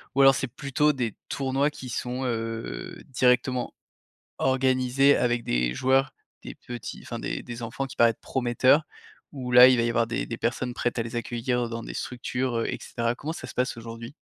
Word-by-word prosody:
Ou 140 Hz, -, +4 dB
alors 135 Hz, 0 st, +7 dB
c'est 130 Hz, -, -2 dB
plutôt 140 Hz, +4 st, +1 dB
des 120 Hz, -6 st, -2 dB
tournois 135 Hz, +1 st, 0 dB
qui 130 Hz, -3 st, -9 dB
sont, 125 Hz, +2 st, -3 dB
heu, 115 Hz, +8 st, -4 dB
directement 125 Hz, -1 st, +1 dB, 0.7 s
organisés 130 Hz, +1 st, +3 dB
avec 120 Hz, -1 st, +1 dB
des -, -, 0 dB
joueurs, 135 Hz, -, +2 dB, 0.3 s
des -, -, -8 dB
petits, 120 Hz, -1 st, -8 dB
enfin -, -, -6 dB
des -, -, -4 dB
des 120 Hz, 0 st, -7 dB
enfants 120 Hz, +4 st, -3 dB
qui 135 Hz, -, -11 dB
paraissent 115 Hz, -1 st, +5 dB
prometteurs, 130 Hz, +3 st, +3 dB, 0.5 s
où, 130 Hz, -4 st, -5 dB
là 125 Hz, +1 st, +10 dB
il 130 Hz, -, +5 dB
va 115 Hz, -, +2 dB
y 120 Hz, -, +1 dB
avoir 115 Hz, -1 st, +2 dB
des 115 Hz, -, -2 dB
des 115 Hz, -, -4 dB
personnes 120 Hz, +1 st, -2 dB
prêtes 120 Hz, 0 st, -1 dB
à -, -, +2 dB
les 115 Hz, +1 st, -6 dB
accueillir 120 Hz, +1 st, -1 dB
dans 115 Hz, 0 st, -5 dB
des -, -, -7 dB
structures, 125 Hz, 0 st, -3 dB
heu -, -, -1 dB
et -, -, -3 dB
cetera. 115 Hz, 0 st, -2 dB
Comment 150 Hz, +5 st, -5 dB
ça -, -, -7 dB
se -, -, -10 dB
passe 125 Hz, -1 st, 0 dB
aujourd'hui? 115 Hz, +2 st, -8 dB
125 Hz, 200 wpm, -26 LUFS, 115-130 Hz, 0.7 s, là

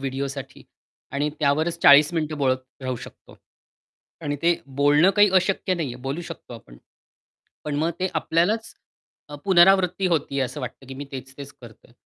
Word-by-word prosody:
व्हिडिओसाठी 135 Hz, 0 st, -5 dB, 0.5 s
आणि 145 Hz, +1 st, 0 dB
त्यावरच 155 Hz, +4 st, +1 dB
40 145 Hz, +3 st, +7 dB
मिनिटे 155 Hz, -1 st, -2 dB
बोलत 130 Hz, -3 st, +1 dB, 0.2 s
राहू 130 Hz, -1 st, -3 dB
शकतो. -, -, -14 dB, 0.8 s
आणि 145 Hz, -2 st, -2 dB
ते 170 Hz, 0 st, +2 dB
बोलणं 145 Hz, +6 st, +3 dB
काही 205 Hz, -1 st, +6 dB
अशक्य 185 Hz, 0 st, +1 dB
नाहीये, 140 Hz, -8 st, -4 dB
बोलू 135 Hz, +6 st, -5 dB
शकतो 165 Hz, -7 st, -10 dB
आपण, -, -, -14 dB, 0.9 s
पण 150 Hz, -1 st, -3 dB
मग 160 Hz, +3 st, +1 dB
ते 185 Hz, -, 0 dB
आपल्यालाच 175 Hz, +8 st, 0 dB, 0.6 s
अ, -, -, -7 dB
पुनरावृत्ती 190 Hz, 0 st, +4 dB
होती 145 Hz, -5 st, -1 dB
असं 135 Hz, +3 st, -3 dB
वाटतं, 125 Hz, +1 st, -8 dB
की 135 Hz, -, -7 dB
मी 140 Hz, +2 st, -7 dB
तेच-तेच 135 Hz, +2 st, -9 dB
करतोय. 115 Hz, 0 st, -15 dB
145 Hz, 150 wpm, -23 LUFS, 135-170 Hz, 0.9 s, 40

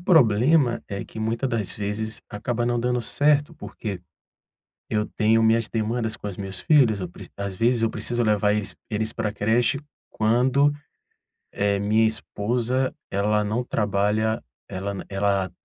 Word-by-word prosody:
problema 135 Hz, -, +4 dB
é 100 Hz, -1 st, -4 dB
que -, -, -11 dB
muita 115 Hz, +4 st, -1 dB
das 115 Hz, -6 st, -1 dB
vezes 105 Hz, +1 st, -3 dB
acaba 120 Hz, +3 st, -2 dB
não 120 Hz, 0 st, +1 dB
dando 125 Hz, 0 st, 0 dB
certo, 145 Hz, +4 st, +2 dB
porque 100 Hz, -5 st, -6 dB, 0.9 s
eu 105 Hz, 0 st, +1 dB
tenho 110 Hz, +1 st, +2 dB
minhas 115 Hz, 0 st, +3 dB
demandas 110 Hz, 0 st, -1 dB
com -, -, -6 dB
os 100 Hz, -, -6 dB
meus 95 Hz, -1 st, -5 dB
filhos, 125 Hz, -8 st, +4 dB
eu 90 Hz, -, -3 dB
preci 85 Hz, -, -12 dB
às 100 Hz, -1 st, -4 dB
vezes 115 Hz, +4 st, +2 dB
eu 115 Hz, -, +2 dB
preciso 120 Hz, +3 st, -1 dB
levar 105 Hz, -1 st, +2 dB
eles 105 Hz, 0 st, -2 dB
eles 110 Hz, +1 st, -1 dB
pra 110 Hz, -2 st, -2 dB
creche 110 Hz, +6 st, +1 dB, 0.3 s
quando, 125 Hz, +6 st, +3 dB, 0.8 s
eh, 100 Hz, 0 st, +1 dB
minha 110 Hz, +2 st, +3 dB
esposa, 120 Hz, +4 st, -1 dB, 0.2 s
ela 105 Hz, +2 st, +1 dB
não 110 Hz, +4 st, -1 dB
trabalha 105 Hz, 0 st, 0 dB, 0.3 s
ela 100 Hz, +2 st, -4 dB
na 95 Hz, -, -6 dB
ela 100 Hz, -1 st, 0 dB
110 Hz, 155 wpm, -24 LUFS, 105-120 Hz, 0.9 s, problema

